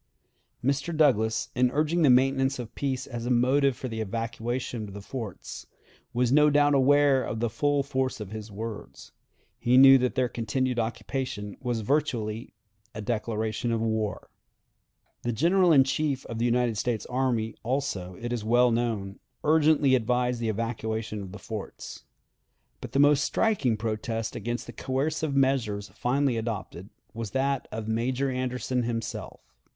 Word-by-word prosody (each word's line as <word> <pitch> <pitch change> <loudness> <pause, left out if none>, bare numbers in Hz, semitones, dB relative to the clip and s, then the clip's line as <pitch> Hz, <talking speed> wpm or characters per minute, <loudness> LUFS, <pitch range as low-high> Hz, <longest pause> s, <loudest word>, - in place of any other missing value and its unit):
Mr. 140 +4 0
Douglas, 110 -8 +2
in 125 0 +3
urging 155 +5 +1
the 150 - +5
maintenance 135 +1 +3
of 120 -3 -7
peace 135 -2 -2
as 120 -2 -5
a - - -1
motive 130 +2 +3
for 130 - -5
the 110 -2 -4
evacuation 115 +1 -3
of 100 - -10
the - - -6
forts, 110 -3 -7 0.4
was 125 0 +1
no 150 +2 +6
doubt 145 0 +4
aware 140 0 +4
of 110 - -4
the 115 -1 -1
full 145 +4 +1
force 130 -2 -2
of 105 -2 -7
his 110 0 -7
words. 110 +1 -8 0.5
He 125 +2 +3
knew 135 0 +9
that 125 0 0
their 130 -2 +2
continued 120 +2 -1
occupation 115 -2 -3
was 120 -3 -2
virtually 115 -4 -1 0.4
a 110 - -4
declaration 110 +1 -2
of 115 - 0
war. 110 -2 -2 0.9
The 120 - -1
General 175 - +3
in 140 -4 +7
Chief 135 0 -1
of 115 -1 -6
the 120 - +1
United 120 -2 +1
States 115 -2 -1
Army, 125 -4 -1
also, 110 -8 -2
it 120 +1 -3
is 115 -3 -3
well 120 +2 +4
known, 110 -4 -2 0.2
urgently 150 -3 +4
advised 125 0 +1
the 115 -1 -1
evacuation 110 -1 -3
of 95 -2 -8
the 100 - -8
forts. 105 +1 -8 0.8
But - - -8
the - - +1
most 145 0 +5
striking 150 - +1
protest 110 +1 -3
against 120 +1 -3
the - - -9
coercive 140 +2 -2
measures 120 -7 +1
finally 130 0 0
adopted 110 -4 -5 0.2
was 115 -2 -5
that 135 0 0
of 110 0 -5
Major 125 +4 0
Anderson 125 0 -2
himself. 115 -1 -4
120 Hz, 155 wpm, -27 LUFS, 110-135 Hz, 0.9 s, knew